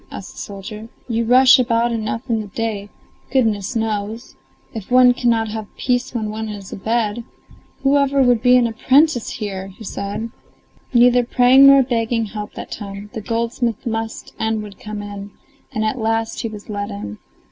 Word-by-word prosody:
asked - - -8
the - - -12
soldier. 210 +2 -8 0.2
"You 230 -1 -1
rush 255 +2 +7
about 235 -1 +2
enough 225 +2 -3
in 225 -3 0
the 210 - -8
day, 210 -1 -4 0.4
goodness 225 -5 0
knows! 220 +1 -3 0.4
If 220 -4 -7
one 250 0 +6
cannot 230 -3 +1
have 215 -1 -5
peace 250 +1 -1
when 215 -2 -2
one 220 0 -4
is 200 -2 -8
in - - -7
bed, 225 +1 -1 0.6
whoever 280 0 +3
would 245 -3 +3
be 250 0 +6
an 245 - +3
apprentice 260 +3 +2
here?" 195 -2 -5
said 210 +1 -5 0.6
he. 245 - +3
Neither 245 0 +5
praying 255 +3 +6
nor 275 -1 +7
begging 230 -2 0
helped 210 0 -7
that - - -8
time; 205 0 -7
the 220 - -5
goldsmith 230 +1 -2
must 225 -1 -4
and 220 -1 -1
would 205 -2 -11
come 210 -1 -6
in, 205 0 -7 0.4
and 220 0 -1
at 230 +4 -1
last 225 0 -1
he - - -2
was 210 -2 -9
let 205 0 -4
in. 200 - -7
225 Hz, 175 wpm, -20 LUFS, 210-245 Hz, 0.6 s, rush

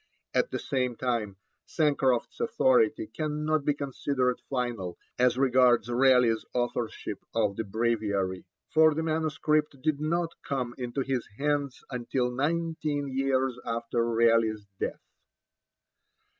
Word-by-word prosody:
At - - +2
the - - -2
same 125 -3 -1
time 115 -6 -2 0.3
Sancroft's 140 - +1
authority 465 -5 +3
cannot 155 - -1
be 145 - +2
considered 135 -2 -1
final 120 -9 -2 0.2
as 125 -1 +3
regards 125 -3 +4
Raleigh's 125 -3 +4
authorship 120 -4 -2 0.2
of 105 -3 +1
the 115 - -2
Breviary, 105 -4 -1 0.3
for 155 -1 +5
the 160 - -1
manuscript 155 -2 0
did 155 -2 0
not 165 +2 0
come 130 -3 -3
into 125 +2 -2
his 130 -3 -2
hands 145 -2 -1
until 125 0 -1
nineteen 150 0 -1
years 135 -2 +1
after 115 0 -1
Raleigh's 115 -2 +2
death. - - -3
130 Hz, 115 wpm, -28 LUFS, 115-150 Hz, 0.3 s, for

